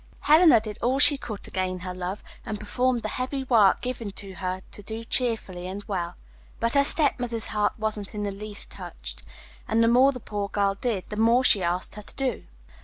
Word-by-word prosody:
Helena 310 Hz, -5 st, +6 dB
did 215 Hz, -1 st, -7 dB
all 255 Hz, +3 st, +1 dB
she 290 Hz, +1 st, +6 dB
could 220 Hz, -7 st, -7 dB
to -, -, -10 dB
gain 185 Hz, -1 st, -2 dB
her 180 Hz, 0 st, -5 dB
love, 185 Hz, +2 st, -5 dB, 0.2 s
and 215 Hz, -3 st, -5 dB
performed 245 Hz, +3 st, 0 dB
the -, -, -1 dB
heavy 260 Hz, +4 st, -3 dB
work 225 Hz, -7 st, +4 dB
given 245 Hz, -4 st, -4 dB, 0.3 s
her 185 Hz, 0 st, -3 dB
to -, -, -6 dB
do 220 Hz, +2 st, -6 dB
cheerfully 225 Hz, -7 st, -2 dB
and 195 Hz, +2 st, -6 dB
well; 180 Hz, -5 st, -4 dB, 0.4 s
but 230 Hz, 0 st, 0 dB
her 280 Hz, -, +5 dB
stepmother's 245 Hz, -7 st, +3 dB
heart 210 Hz, -1 st, 0 dB
wasn't 215 Hz, -1 st, -4 dB
in 210 Hz, -, -3 dB
the 200 Hz, -, -2 dB
least 205 Hz, +1 st, -8 dB
touched, -, -, -8 dB, 0.5 s
and 225 Hz, +1 st, +2 dB
the -, -, +4 dB
more 255 Hz, +4 st, +5 dB
the 255 Hz, -, -7 dB
poor 205 Hz, -3 st, -4 dB
girl 200 Hz, -1 st, +1 dB
did 200 Hz, -2 st, -3 dB
the 210 Hz, -, -5 dB
more 230 Hz, +3 st, +4 dB
she 205 Hz, -6 st, +6 dB
asked 175 Hz, +1 st, -1 dB
her 210 Hz, -, -7 dB
to -, -, -6 dB
do. 265 Hz, -4 st, -2 dB
215 Hz, 205 wpm, -26 LUFS, 195-245 Hz, 0.5 s, Helena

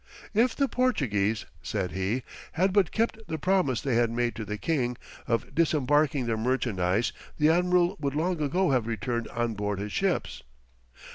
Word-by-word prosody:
"If 230 Hz, +3 st, +3 dB
the 280 Hz, -, +2 dB
Portuguese," 110 Hz, -, 0 dB, 0.2 s
said 95 Hz, -4 st, -2 dB
he, 100 Hz, +7 st, -1 dB, 0.3 s
"had 185 Hz, +3 st, +2 dB
but 195 Hz, -4 st, +3 dB
kept 225 Hz, 0 st, 0 dB
the 160 Hz, -, -3 dB
promise 175 Hz, -, +1 dB
they 135 Hz, -, -1 dB
had 120 Hz, -1 st, +3 dB
made 120 Hz, +1 st, 0 dB
to 115 Hz, -, -4 dB
the 105 Hz, 0 st, -4 dB
king, 125 Hz, -4 st, -1 dB, 0.3 s
of 115 Hz, 0 st, -1 dB
disembarking 145 Hz, -3 st, +2 dB
their 115 Hz, -1 st, 0 dB
merchandise, 110 Hz, -4 st, 0 dB, 0.2 s
the 150 Hz, 0 st, +4 dB
admiral 180 Hz, +2 st, +3 dB
would 140 Hz, -1 st, -2 dB
long 170 Hz, +1 st, 0 dB
ago 175 Hz, +4 st, +1 dB
have 125 Hz, -4 st, +1 dB
returned 115 Hz, +1 st, -2 dB
on 120 Hz, -1 st, -2 dB
board 105 Hz, -1 st, -2 dB
his 100 Hz, +1 st, -4 dB
ships." 195 Hz, -2 st, -1 dB
130 Hz, 165 wpm, -27 LUFS, 115-175 Hz, 0.3 s, the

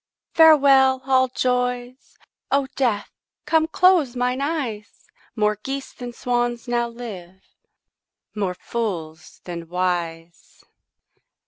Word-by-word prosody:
Farewell, 275 Hz, -5 st, +6 dB
all 260 Hz, -1 st, +3 dB
joys; 250 Hz, 0 st, -2 dB, 0.3 s
O 275 Hz, 0 st, +2 dB
Death, 235 Hz, -7 st, 0 dB, 0.3 s
come 315 Hz, +1 st, +2 dB
close 345 Hz, -9 st, +3 dB
mine 250 Hz, +2 st, -1 dB
eyes; 270 Hz, -9 st, -4 dB, 0.3 s
More 210 Hz, -1 st, +1 dB
geese 270 Hz, +2 st, -5 dB
than 245 Hz, -1 st, -7 dB
swans 240 Hz, 0 st, -2 dB
now 240 Hz, 0 st, 0 dB
live, 190 Hz, -6 st, -9 dB, 0.9 s
more 195 Hz, -4 st, -2 dB
fools 165 Hz, -9 st, -5 dB
than 170 Hz, -2 st, -7 dB
wise. 170 Hz, -2 st, -4 dB
245 Hz, 100 wpm, -22 LUFS, 195-265 Hz, 0.9 s, Farewell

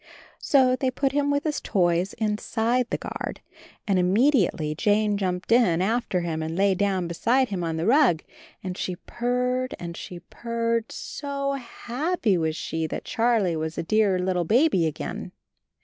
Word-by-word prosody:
So 260 Hz, -3 st, +4 dB
they 260 Hz, 0 st, 0 dB
put 265 Hz, +1 st, 0 dB
him 285 Hz, 0 st, +1 dB
with 285 Hz, 0 st, +1 dB
his 300 Hz, -2 st, -2 dB
toys 180 Hz, -1 st, +1 dB
inside 225 Hz, +3 st, 0 dB
the -, -, -1 dB
guard, -, -, -6 dB, 0.5 s
and 195 Hz, -2 st, +2 dB
immediately 185 Hz, -, +2 dB
Jane 210 Hz, +4 st, +2 dB
jumped 185 Hz, 0 st, -2 dB
in 225 Hz, -9 st, +4 dB
after 195 Hz, -1 st, 0 dB
him 165 Hz, -2 st, -3 dB
and 160 Hz, +1 st, -3 dB
lay 195 Hz, +1 st, +3 dB
down 190 Hz, -2 st, 0 dB
be 170 Hz, -, -4 dB
side 255 Hz, +9 st, +2 dB
him 190 Hz, -3 st, -3 dB
on 165 Hz, -1 st, -2 dB
the 165 Hz, -, -1 dB
rug, 240 Hz, -, +4 dB, 0.4 s
and 185 Hz, -1 st, -4 dB
she 180 Hz, -1 st, -3 dB
purred 250 Hz, +5 st, -2 dB
and 170 Hz, -1 st, -6 dB
she 175 Hz, 0 st, -8 dB
purred, 230 Hz, +4 st, -2 dB
so 280 Hz, -1 st, -4 dB
happy 250 Hz, -, -1 dB
was 160 Hz, -2 st, 0 dB
she 160 Hz, -1 st, -3 dB
that -, -, -5 dB
Charlie 225 Hz, -7 st, +1 dB
was 160 Hz, 0 st, -3 dB
a -, -, -1 dB
dear 205 Hz, +1 st, +2 dB
little 180 Hz, -1 st, 0 dB
baby 215 Hz, -, +3 dB
again. 155 Hz, -, -5 dB
210 Hz, 165 wpm, -25 LUFS, 175-250 Hz, 0.5 s, So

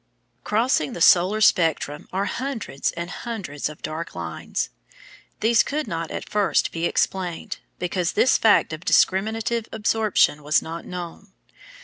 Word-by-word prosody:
Crossing 215 Hz, -, +1 dB
the -, -, -6 dB
solar 185 Hz, +5 st, +5 dB
spectrum 160 Hz, -6 st, +2 dB
are 195 Hz, +2 st, -1 dB
hundreds 240 Hz, -, -3 dB
and 170 Hz, 0 st, -5 dB
hundreds 190 Hz, -, -4 dB
of 150 Hz, -, -12 dB
dark 160 Hz, -, -5 dB
lines. 85 Hz, -2 st, -4 dB, 0.7 s
These 225 Hz, 0 st, +5 dB
could 300 Hz, -1 st, -2 dB
not 165 Hz, -3 st, -3 dB
at -, -, -6 dB
first 205 Hz, -2 st, +1 dB
be 165 Hz, +1 st, -1 dB
explained, 180 Hz, -3 st, -2 dB, 0.2 s
because 180 Hz, 0 st, -1 dB
this 255 Hz, -, +4 dB
fact 210 Hz, -7 st, +4 dB
of 155 Hz, +2 st, -7 dB
discriminative 220 Hz, +5 st, +2 dB
absorption 215 Hz, -8 st, +2 dB
was 150 Hz, +2 st, +3 dB
not 165 Hz, +1 st, -7 dB
known. 180 Hz, +2 st, -8 dB
180 Hz, 135 wpm, -23 LUFS, 165-220 Hz, 0.7 s, solar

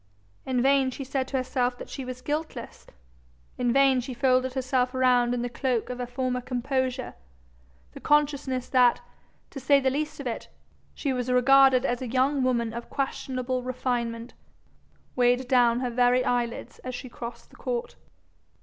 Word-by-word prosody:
In 250 Hz, -2 st, +1 dB
vain 270 Hz, -1 st, +4 dB
she 265 Hz, +2 st, -6 dB
said 265 Hz, 0 st, -2 dB
to 270 Hz, -, -2 dB
herself 255 Hz, -1 st, -1 dB
that -, -, -9 dB
she 270 Hz, -, -6 dB
was 255 Hz, 0 st, -7 dB
guiltless; 305 Hz, +3 st, -5 dB, 0.7 s
in 245 Hz, -1 st, +2 dB
vain 270 Hz, 0 st, +4 dB
she 255 Hz, 0 st, -7 dB
folded 255 Hz, 0 st, +2 dB
herself 255 Hz, -1 st, 0 dB
round 250 Hz, -2 st, +3 dB
in 245 Hz, -1 st, -1 dB
the -, -, -1 dB
cloak 245 Hz, -1 st, -2 dB
of 250 Hz, -, -6 dB
her 245 Hz, -, -3 dB
former 250 Hz, 0 st, -2 dB
composure; 255 Hz, +1 st, -2 dB, 0.8 s
the -, -, -9 dB
consciousness 285 Hz, -4 st, +1 dB
that, 250 Hz, -2 st, +4 dB, 0.5 s
to 275 Hz, -, -7 dB
say 275 Hz, +2 st, +4 dB
the 265 Hz, -1 st, +1 dB
least 300 Hz, +3 st, -3 dB
of 280 Hz, -, -6 dB
it, 240 Hz, -, -4 dB, 0.5 s
she 275 Hz, -3 st, -1 dB
was 250 Hz, 0 st, -2 dB
regarded 265 Hz, +1 st, +5 dB
as 245 Hz, -1 st, -1 dB
a 255 Hz, -, -3 dB
young 265 Hz, +3 st, +1 dB
woman 235 Hz, -3 st, 0 dB
of 235 Hz, 0 st, -7 dB
questionable 255 Hz, -2 st, -2 dB
refinement, 240 Hz, -2 st, -3 dB, 0.8 s
weighed 245 Hz, 0 st, +2 dB
down 245 Hz, -1 st, +3 dB
her 250 Hz, -, -1 dB
very 245 Hz, +1 st, +3 dB
eyelids 240 Hz, -1 st, -2 dB
as 255 Hz, -1 st, -6 dB
she 255 Hz, -, -7 dB
crossed 235 Hz, -1 st, -9 dB
the -, -, -18 dB
court. 485 Hz, 0 st, -4 dB
255 Hz, 170 wpm, -26 LUFS, 245-265 Hz, 0.8 s, regarded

